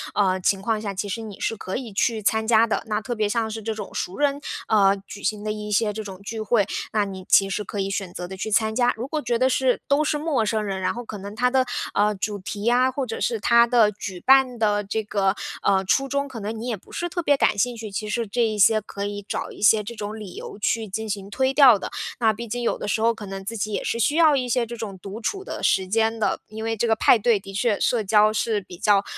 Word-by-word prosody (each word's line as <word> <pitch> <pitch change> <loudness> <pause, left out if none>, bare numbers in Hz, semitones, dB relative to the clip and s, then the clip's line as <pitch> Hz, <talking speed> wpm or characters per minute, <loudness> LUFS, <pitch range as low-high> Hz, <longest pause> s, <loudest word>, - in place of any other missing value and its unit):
呃， 190 -2 +2
情 195 +2 +2
况 220 0 0
下， 205 -2 -4
其 200 +2 -3
实 210 +3 -4
你 215 -3 -9
是 225 - -1
可 190 -3 -6
以 240 -5 -7
去 220 +2 0
参 220 +2 +1
加 225 0 +5
的。 225 - -1
那 210 -1 0
特 240 - -4
别 215 -3 0
像 225 0 0
是 220 +1 -5
这 220 +1 -3
种 210 -2 -7
熟 180 - -4
人， 285 -1 +1 0.3
呃， 200 -2 +4
举 200 - -10
行 210 -1 -1
的 215 - -2
一 210 0 -5
些 210 +1 +2
这 215 +1 -5
种 190 -3 -9
聚 220 +2 -5
会， 215 -1 +2 0.3
那 210 -2 +2
你 190 -1 -7
其 195 - +6
实 210 - -2
可 205 +1 -6
以 195 0 -1
选 195 -2 -3
择 180 - -6
地 190 - -7
去 190 +3 -4
参 220 0 +2
加。 245 0 +3
如 240 +4 -4
果 310 +1 -2
觉 240 -2 0
得 255 +2 +3
是， 260 -1 +2
都 285 +2 +3
是 300 0 0
陌 295 -6 0
生 215 0 0
人， 195 -2 -3
然 185 - +1
后 240 - -5
可 215 - -7
能 200 +2 -8
它 250 +3 +2
的， 260 0 +3 0.3
呃， 210 +1 +2
主 205 +1 -3
题 200 +2 -6
呀， 245 +3 +3
或 270 +1 -2
者 225 -2 -5
是 230 -2 0
它 235 +2 +5
的 230 -3 +4
举 190 -3 -7
办 265 +2 +4
的 210 -2 +1
这 220 +2 -2
个， 200 -2 0 0.3
呃， 195 -1 +2
初 270 +8 +2
衷， 280 +1 -1
可 260 -4 -8
能 215 +2 -4
你 235 - -5
也 240 - -1
不 - - -20
是 345 - -3
特 345 - -2
别 290 -3 +3
感 210 - +2
兴 245 +4 +1
趣， 220 -2 -7
其 210 +2 -4
实 230 +2 -1
这 240 +4 -1
一 215 -1 -2
些 215 +2 +5
可 200 -1 -6
以 205 0 -5
找 - - -3
一 - - -12
些 210 +1 +5
这 235 +3 -7
种 210 0 -5
理 195 -4 -9
由 - - -8
去 220 +1 0
进 220 +3 -4
行 200 -1 -4
推 260 +5 0
掉 265 -6 +7
的。 - - -6 0.3
那 225 -2 +4
毕 235 +3 -7
竟 245 +3 -3
有 - - 0
的 - - -5
时 215 +2 0
候 230 +1 +3
可 220 -2 -9
能 195 0 -7
自 225 +3 -4
己 215 +1 -2
也 - - -2
是 230 - -2
需 290 +6 +2
要 315 -3 +5
一 255 -2 -1
些 240 0 +1
这 235 +1 -7
种 205 -4 -6
独 200 +4 -8
处 390 - -2
的 - - -6
时 190 -1 +2
间 225 +3 +1
的， 215 - 0
因 220 +1 -7
为 225 0 -1
这 235 - +1
个 225 - +3
派 225 - +5
对 220 -1 +3
的 195 0 -11
确 210 +1 +1
社 235 -3 +1
交 210 +1 +4
是 215 -1 0
比 180 -2 -12
较， 200 +1 +3
220 Hz, 300 characters per minute, -23 LUFS, 205-235 Hz, 0.3 s, 掉